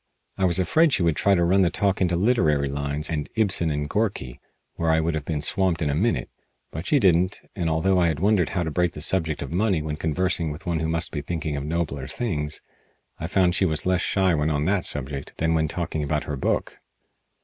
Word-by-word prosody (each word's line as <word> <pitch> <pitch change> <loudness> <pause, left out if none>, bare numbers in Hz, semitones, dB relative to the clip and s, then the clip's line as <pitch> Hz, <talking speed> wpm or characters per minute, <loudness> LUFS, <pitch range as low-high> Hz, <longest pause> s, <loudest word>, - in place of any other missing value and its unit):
I 95 - 0
was 85 -1 +4
afraid 155 - +3
she 95 - +2
would 85 -2 +2
try 100 -1 +3
to 85 - +2
run 95 +3 +3
the 90 - +4
talk 100 +1 0
into 90 -2 +2
literary 85 - +2
lines 70 +2 -2
and 75 -3 -3
Ibsen 95 -7 +2
and 75 -1 -2
Gorky, 95 - -2 0.3
where 85 - -1
I 80 0 +3
would 80 +1 0
have 75 -2 -3
been 75 -3 -2
swamped 95 -3 +1
in 75 -3 0
a - - -1
minute, 80 - 0 0.4
but 80 +3 -6
she 150 - +4
didn't, 95 -4 +3 0.2
and, 85 -4 -1
although 90 +4 +2
I 85 - +3
had 80 -3 -1
wondered 100 -3 +2
how 90 -3 -1
to 80 - -3
break 90 +2 0
the 75 - -7
subject 80 -3 0
of 70 - -7
money 95 0 +1
when 75 -1 -4
conversing 85 +1 0
with 75 +5 -8
one 85 -2 -1
who 80 - -1
must 80 +1 -1
be 75 - -3
thinking 80 -1 -3
of 70 - -3
nobler 75 -4 -2
things, 75 - -3 0.6
I 80 - -3
found 90 0 +2
she 95 - 0
was 80 -4 0
less 90 -1 +2
shy 95 -2 +1
when 75 -1 +1
on 75 -1 0
that 95 +2 +1
subject 70 -1 -1
than 80 0 +1
when 80 -1 +1
talking 80 -1 -3
about 75 +1 -1
her 75 - -4
book. 65 - -2
80 Hz, 235 wpm, -24 LUFS, 75-95 Hz, 0.6 s, was